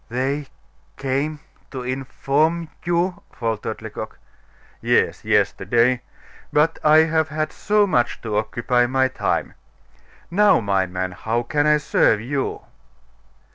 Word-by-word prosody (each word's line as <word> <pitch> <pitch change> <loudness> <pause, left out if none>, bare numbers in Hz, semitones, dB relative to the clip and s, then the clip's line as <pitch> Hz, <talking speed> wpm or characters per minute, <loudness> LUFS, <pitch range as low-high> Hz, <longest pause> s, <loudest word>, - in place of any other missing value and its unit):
"They 135 +4 -2 0.5
came 140 +3 -2 0.3
to 130 -2 -6
inform 140 +5 -1 0.2
you 175 +3 0
" - - -38
faltered 115 -3 -3
Lecoq. - - -7 0.6
"Yes, - - +1
yesterday; 120 +1 +2 0.5
but 155 +2 +2
I 155 +1 +6
have 160 -1 +1
had 155 0 -2
so 210 0 +2
much 120 -11 0
to 110 -3 -3
occupy 120 +2 +1
my 130 +1 +2
time. - - -2 0.8
Now, 205 +3 +5
my 100 -3 +1
man, 90 +1 -3
how 115 +6 -2
can 145 +4 0
I 150 0 +5
serve 140 -6 +2
you?" 135 +4 -3
135 Hz, 125 wpm, -22 LUFS, 120-155 Hz, 0.8 s, I